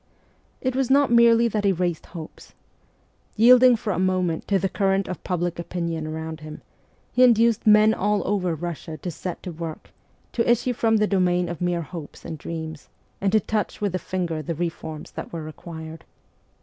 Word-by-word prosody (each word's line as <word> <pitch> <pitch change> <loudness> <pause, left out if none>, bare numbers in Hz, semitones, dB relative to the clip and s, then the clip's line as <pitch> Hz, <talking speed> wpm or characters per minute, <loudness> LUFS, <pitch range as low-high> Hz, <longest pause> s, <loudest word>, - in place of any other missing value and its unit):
It 255 -1 -1
was 265 -2 0
not 280 -1 +4
merely 235 0 +6
that 215 -2 -1
he 200 - +4
raised 175 -2 -2
hopes. 160 -3 -11 0.8
Yielding 250 +2 +7
for 215 -2 -2
a - - -2
moment 185 -3 0
to 200 - +3
the 195 +1 0
current 195 0 0
of 185 - -6
public 175 -1 -2
opinion 170 -2 -3
around 160 0 -5
him, 155 0 -10 0.5
he 250 - +1
induced 230 -2 +4
men 215 +1 +7
all 210 -1 0
over 185 -4 0
Russia 160 -1 -6
to 175 - -5
set 175 +3 -6
to 180 - -5
work, 165 -1 -7 0.4
to 235 0 0
issue 240 +1 +2
from 225 -1 +2
the 210 - +3
domain 180 -3 +1
of 170 -1 -6
mere 175 -1 0
hopes 160 -1 -9
and 160 - -6
dreams, 160 -1 -7 0.3
a'nd 195 0 +1
to 215 - +6
touch 215 0 -2
with 205 -2 0
the 185 - -2
finger 175 -4 -3
the 165 +3 -4
reforms 160 -2 -5
that - - -7
were 165 -2 -5
required. 160 +1 -9
180 Hz, 185 wpm, -24 LUFS, 165-215 Hz, 0.8 s, Yielding